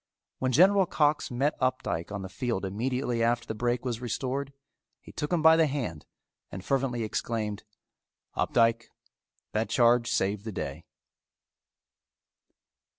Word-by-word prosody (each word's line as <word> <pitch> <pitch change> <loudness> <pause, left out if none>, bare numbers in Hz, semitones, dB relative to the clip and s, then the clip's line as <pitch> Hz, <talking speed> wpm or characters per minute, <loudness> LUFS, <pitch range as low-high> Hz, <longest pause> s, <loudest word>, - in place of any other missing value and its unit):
When 130 0 0
General 190 +7 +5
Cox 150 -1 +1
met 135 +4 0
Opdycke 130 -9 -1
on 100 -1 -4
the - - -5
field 115 0 -3
immediately 120 +4 -1
after 120 +1 +1
the - - -4
break 120 +3 -1
was 120 -2 -2
restored, 130 +3 -3 0.5
he - - -14
took 150 - -4
him 170 -3 +1
by 160 0 +8
the 160 -1 +4
hand 120 - -4 0.4
and 95 +1 -8
fervently 130 -4 0
exclaimed, 110 -1 -3 0.7
"Opdycke, 115 -1 +2 0.7
that 110 +1 -1
charge 120 -1 +4
saved 105 -3 0
the 110 - -5
day." - - -5
120 Hz, 135 wpm, -28 LUFS, 110-135 Hz, 0.7 s, by